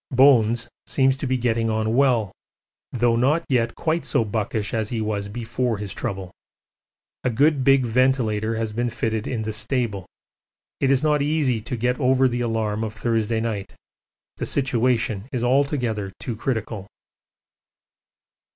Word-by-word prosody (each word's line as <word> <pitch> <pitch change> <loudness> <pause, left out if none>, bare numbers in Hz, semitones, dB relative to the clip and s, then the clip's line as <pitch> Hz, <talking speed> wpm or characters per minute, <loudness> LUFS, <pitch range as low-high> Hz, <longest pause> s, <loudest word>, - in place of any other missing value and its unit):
'Bones' 120 -3 +4 0.2
seems 135 -1 +3
to 135 - -3
be 130 0 +1
getting 115 -2 0
on 110 +1 0
well, 125 -7 +3 0.6
though 120 -1 +2
not 145 +8 +2
yet 120 -3 +1
quite 165 +1 -1
so 115 - +1
buckish 105 -1 -2
as 110 -2 -1
he 120 - -2
was 105 -2 -2
before 120 +2 -2
his 100 -1 -5
trouble. 95 -2 -4 0.9
A - - +1
good 140 +4 +2
big 135 -1 +4
ventilator 115 -3 +1
has 110 -1 -2
been 120 +2 -1
fitted 110 -2 -2
in 115 -4 -2
the 110 0 -3
stable. 110 -3 -1 0.7
It 135 - +2
is 135 0 +3
not 150 -1 +2
easy 145 -6 +1
to 120 +3 -4
get 125 +2 0
over 130 0 +4
the 120 -1 -2
alarm 110 -2 -1
of 110 -1 -4
Thursday 115 0 0
night 110 -4 -4 0.6
the - - -3
situation 120 -4 0
is 125 -3 -2
altogether 125 -6 +1
too 120 - -4
critical. 110 -4 -3
115 Hz, 150 wpm, -23 LUFS, 110-130 Hz, 0.9 s, Bones